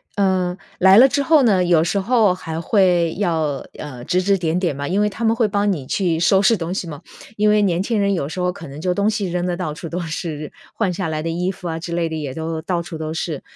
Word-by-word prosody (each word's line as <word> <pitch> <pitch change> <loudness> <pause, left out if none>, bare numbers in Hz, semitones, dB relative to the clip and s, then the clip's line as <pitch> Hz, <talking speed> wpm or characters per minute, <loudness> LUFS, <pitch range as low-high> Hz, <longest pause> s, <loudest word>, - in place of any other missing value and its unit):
呃 185 -2 +1 0.2
来 190 +1 +7
了 255 +4 +9
之 275 +2 0
后 310 -1 +5
呢， 195 -6 +3
有 175 -3 +4
时 200 - 0
候 220 -2 +3
还 160 -3 -5
会 175 -2 +2
要 160 -7 -1
呃， 130 -5 -8
指 180 +8 +1
指 195 +1 +2
点 170 0 -1
点 175 -6 -1
嘛， 140 +1 -4
因 195 +3 +1
为 210 - +2
他 230 +3 -7
们 225 - +3
会 230 -3 +2
帮 205 0 +1
你 140 -8 -4
去 175 -5 0
收 190 +3 +4
拾 220 +3 +4
东 170 0 -4
西 190 - -3
嘛。 150 -1 -8 0.4
因 210 0 +3
为 210 0 +4
年 180 -3 +1
轻 215 +1 -1
人 200 0 +2
有 155 -7 -2
时 160 - -8
候 180 - +1
可 165 -3 -10
能 140 +3 -9
就 180 0 0
东 200 +3 +1
西 210 -4 -2
扔 180 0 -1
得 180 -1 -1
到 165 -4 -4
处 165 +2 -8
都 175 +3 -4
是。 160 -2 -5 0.2
换 200 -5 0
下 185 -1 -3
来 155 -1 -2
的 165 - -2
衣 175 +3 -1
服 180 -2 -8
啊 160 - -3
之 170 +1 -6
类 170 -1 0
的， 160 - -4
也 140 -4 -5
都 160 +1 -4
到 175 0 -1
处 165 -1 -7
都 155 0 -4
是。 160 -3 -4
180 Hz, 290 characters per minute, -20 LUFS, 160-200 Hz, 0.4 s, 了